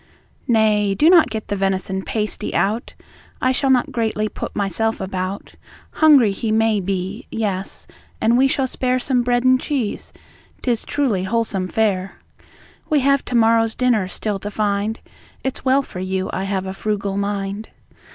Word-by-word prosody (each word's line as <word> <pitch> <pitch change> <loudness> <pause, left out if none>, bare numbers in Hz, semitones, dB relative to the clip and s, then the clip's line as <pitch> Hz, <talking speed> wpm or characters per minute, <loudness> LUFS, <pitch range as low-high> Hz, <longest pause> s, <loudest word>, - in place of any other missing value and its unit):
Nay, 210 -4 +3
do 310 - +5
not 345 -3 +6
get 220 -1 -5
the 205 - 0
venison 190 0 -1
pasty 210 +1 -3
out; 215 +4 -1 0.4
I 255 - +2
shall 270 +1 0
not 255 -2 +3
greatly 220 -2 -1
put - - -6
myself 210 +3 0
about 190 0 -4 0.4
Hungry, 285 -9 +5
he 215 +3 -3
may 220 -1 +2
be; 195 +4 -4
yes, 200 -4 -3 0.3
and 230 +2 +3
we 265 +2 +5
shall 270 0 0
spare 255 0 0
Some 255 0 +1
bread 245 0 +1
and 255 0 +4
cheese, 260 -8 -3 0.5
'tis 240 -3 0
truly 225 -11 0
whole 230 +4 +1
some 190 -4 -3
fare. 195 -2 0 0.7
We 300 -2 +3
have 275 +1 +3
to 250 - -3
morrow's 225 -1 +3
dinner 240 -7 +2
still 205 +1 -3
to 205 - -5
find; 210 +1 -1 0.4
It's 265 - -3
well 265 +2 +3
for 180 - -9
you 185 0 -2
I 190 - -2
have 195 -1 -2
a 190 - -4
frugal 200 -1 -2
mind. 200 +1 -3
215 Hz, 165 wpm, -20 LUFS, 195-245 Hz, 0.7 s, not